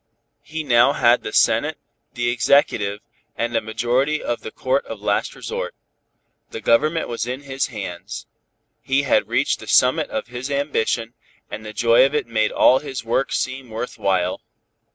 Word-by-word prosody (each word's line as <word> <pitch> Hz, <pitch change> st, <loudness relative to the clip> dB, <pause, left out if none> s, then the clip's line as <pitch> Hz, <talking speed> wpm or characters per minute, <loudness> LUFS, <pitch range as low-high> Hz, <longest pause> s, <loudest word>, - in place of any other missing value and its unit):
He 160 Hz, +1 st, -5 dB
now 130 Hz, 0 st, +4 dB
had 120 Hz, 0 st, +4 dB
the -, -, -6 dB
Senate, -, -, +2 dB, 0.4 s
the 120 Hz, 0 st, -1 dB
Executive 105 Hz, -5 st, +2 dB, 0.4 s
and 120 Hz, 0 st, -2 dB
a 115 Hz, -, +2 dB
majority 125 Hz, +7 st, 0 dB
of 120 Hz, -, -3 dB
the -, -, -6 dB
Court 130 Hz, +4 st, -1 dB
of 115 Hz, -, -7 dB
last 100 Hz, 0 st, -1 dB
resort. -, -, -5 dB, 0.7 s
The -, -, -6 dB
government 155 Hz, +9 st, +2 dB
was 115 Hz, 0 st, -3 dB
in 130 Hz, +2 st, -4 dB
his 135 Hz, -1 st, -2 dB
hands. 95 Hz, -6 st, -7 dB, 0.6 s
He 135 Hz, +1 st, +1 dB
had 140 Hz, -, +2 dB
reached -, -, +1 dB
the -, -, -11 dB
summit -, -, +3 dB
of -, -, -3 dB
his 125 Hz, +3 st, -6 dB
ambition, 125 Hz, -5 st, -1 dB, 0.4 s
and 110 Hz, -, -6 dB
the 110 Hz, -, -7 dB
joy 115 Hz, +3 st, +4 dB
of 140 Hz, +2 st, +1 dB
it 150 Hz, -, 0 dB
made 110 Hz, -2 st, 0 dB
all 130 Hz, -, +5 dB
his 135 Hz, -4 st, -6 dB
work 125 Hz, +4 st, 0 dB
seem 130 Hz, -1 st, -3 dB
worth 115 Hz, +3 st, -6 dB
while. 90 Hz, -2 st, 0 dB
120 Hz, 170 wpm, -21 LUFS, 110-135 Hz, 0.7 s, all